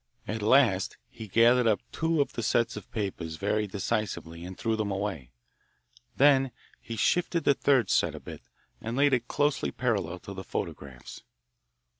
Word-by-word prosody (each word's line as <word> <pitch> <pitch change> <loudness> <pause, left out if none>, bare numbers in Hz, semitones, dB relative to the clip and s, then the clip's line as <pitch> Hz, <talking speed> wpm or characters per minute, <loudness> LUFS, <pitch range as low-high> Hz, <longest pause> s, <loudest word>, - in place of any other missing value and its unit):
At 110 +1 -3
last 110 -4 +3
he 110 - -9
gathered 115 +4 +4
up 110 -2 +3
two 160 -1 +1
of 140 - -2
the - - -3
sets 115 +1 +1
of 105 -2 -9
papers 90 -6 -4
very 105 +4 -1
decisively 95 -5 -3
and 90 +1 -8
threw 115 -1 0
them 110 -2 -2
away. 95 -10 -3 0.9
Then 135 -1 +5 0.3
he 115 - -6
shifted 170 - +1
the 140 - +5
third 130 -6 +2
set - - +2
a - - -7
bit, - - -10 0.4
and 115 +3 -4
laid 140 0 +4
it 120 -1 +1
closely 145 0 0
parallel 100 -8 -1
to 100 - -8
the 95 0 -7
photographs. 65 -8 -6
110 Hz, 165 wpm, -28 LUFS, 95-125 Hz, 0.9 s, Then